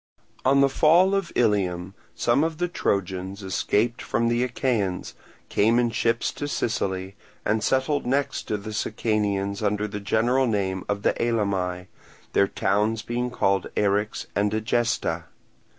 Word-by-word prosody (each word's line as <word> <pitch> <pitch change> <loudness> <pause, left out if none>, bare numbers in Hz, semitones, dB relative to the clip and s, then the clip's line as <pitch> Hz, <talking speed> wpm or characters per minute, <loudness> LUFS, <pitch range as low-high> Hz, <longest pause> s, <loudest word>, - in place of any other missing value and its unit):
On 140 +1 +4
the 140 - +6
fall 165 +7 +4
of 195 -3 0
Ilium, 95 -5 +1 0.2
some 120 +5 +2
of 160 -1 -1
the 175 - 0
Trojans 95 - -2
escaped 105 +5 0
from 115 +1 0
the 120 +1 +1
Achaeans, 115 -7 -1 0.3
came 115 +3 +3
in 120 -1 +2
ships 115 +1 0
to 145 - -5
Sicily, 95 -7 -2 0.3
and 110 0 +1
settled 130 +1 +1
next 140 +2 0
to 105 - -1
the 105 +1 -7
Sicanians 105 -2 -1
under 105 0 0
the 105 0 -5
general 120 +6 +2
name 95 -4 -1
of 100 0 -1
Elymi; 100 -6 0 0.5
their 100 - +4
towns 105 +3 0
being 120 +1 -2
called 100 -6 +1
Eryx 105 +1 0
and 100 0 +2
Egesta. 115 +2 0
110 Hz, 140 wpm, -25 LUFS, 100-120 Hz, 0.5 s, the